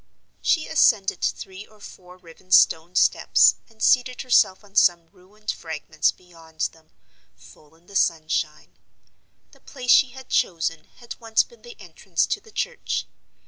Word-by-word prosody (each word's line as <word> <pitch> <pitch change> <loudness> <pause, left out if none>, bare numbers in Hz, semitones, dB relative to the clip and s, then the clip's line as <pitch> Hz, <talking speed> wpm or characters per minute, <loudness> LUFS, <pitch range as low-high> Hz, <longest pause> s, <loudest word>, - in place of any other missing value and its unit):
She 320 -3 +1
ascended 220 -10 +2
three 190 +2 -4
or 215 - -23
four 180 -2 -14
riven 180 +1 -19
stone 170 -1 +4
steps, - - +4
and 220 -1 -10
seated 250 0 +2
herself 210 -6 +2
on 200 -1 -21
some 175 -4 +3
ruined 200 +3 -8
fragments 155 -1 -2
beyond 165 -3 -16
them, 160 -1 -24 0.5
full 150 +1 -20
in 165 +1 -28
the 200 - -15
sunshine. 155 -3 -1 0.7
The - - -21
place 250 -3 -3
she 265 - +6
had 260 +1 -13
chosen 165 -2 -1
had 240 -1 -11
once 225 -1 +2
been 475 - -21
the 480 -1 -14
entrance - - -2
to - - -3
the 445 - -19
church. 485 +3 -3
190 Hz, 150 wpm, -23 LUFS, 165-240 Hz, 0.7 s, she